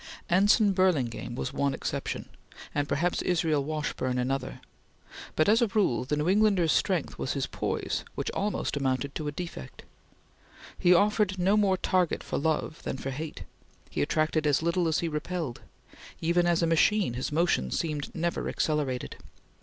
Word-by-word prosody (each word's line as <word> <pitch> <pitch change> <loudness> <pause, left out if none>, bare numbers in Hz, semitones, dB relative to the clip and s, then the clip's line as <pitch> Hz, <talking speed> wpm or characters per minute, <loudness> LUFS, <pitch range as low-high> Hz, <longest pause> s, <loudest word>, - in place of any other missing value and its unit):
Anson 200 +3 +5
Burlingame 150 -12 0
was - - -4
one 140 -1 0
exception, - - -4 0.5
and 145 0 -1
perhaps 175 +4 0
Israel 160 -5 +1
Washburn 150 -4 -2
another; 130 +1 -2 0.8
but 155 - +3
as 220 +4 +5
a 235 - +4
rule 190 - +1
the 150 +3 -1
New 150 +2 0
Englander's 195 -4 +3
strength 180 -6 0
was 135 - -1
his 140 -2 -1
poise - - -2
which - - -2
almost 205 -5 -2
amounted 135 0 -1
to 155 - -4
a - - -1
defect. 160 - -7 1.0
He 175 - +4
offered 205 +1 +3
no 190 +3 +3
more 200 -3 +3
target 180 -2 +1
for - - -2
love 155 +1 -1
than - - -4
for 135 - -4
hate; 150 +3 -6 0.5
he - - -1
attracted 155 0 +1
as 145 +1 +2
little 170 +1 +1
as 160 - +1
he 170 - -1
repelled; 155 -3 -4 0.6
even 175 +1 +2
as 170 -1 +2
a - - +4
machine, 165 - +3
his 125 +4 -3
motion 155 - +1
seemed 150 - -2
never 170 +1 -1
accelerated. 145 -5 -1
160 Hz, 160 wpm, -28 LUFS, 140-180 Hz, 1.0 s, Anson